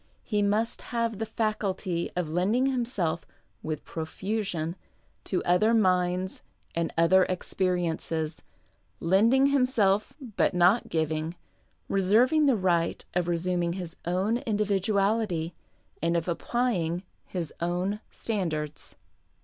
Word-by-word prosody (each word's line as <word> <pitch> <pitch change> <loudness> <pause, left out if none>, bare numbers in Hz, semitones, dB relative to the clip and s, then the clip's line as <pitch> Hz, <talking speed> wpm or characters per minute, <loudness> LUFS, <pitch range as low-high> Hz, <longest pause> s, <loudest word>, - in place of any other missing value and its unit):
He 210 -2 0
must 210 +3 +1 0.2
have 230 -3 0
the 225 - -2
faculty 200 -5 -1
of 180 -2 -1
lending 190 +11 +1
himself, 235 -11 -1 0.4
with 155 -1 -4
profusion, 170 0 -3 0.5
to 185 - -1
other 215 +6 +3
minds 185 -2 +1 0.3
and 170 -1 -1
other 185 +3 +5
experiences 170 -4 -1 0.3
— - - -41
lending 230 +7 +5
himself, 220 -7 +2 0.2
but 195 - +2
not 180 +6 +4
giving, 160 +1 -1 0.5
reserving 235 +11 +4
the 260 -5 +4
right 175 -3 +1
of 180 -1 0
resuming 175 0 0
his 175 -2 -6
own 190 +6 +1
individuality 205 - 0 0.5
and 170 +1 +2
of 165 - -2
applying 180 -3 0 0.2
his 170 -5 -4
own 180 +4 -1
standards. 155 -9 -3
185 Hz, 110 wpm, -28 LUFS, 170-215 Hz, 0.5 s, other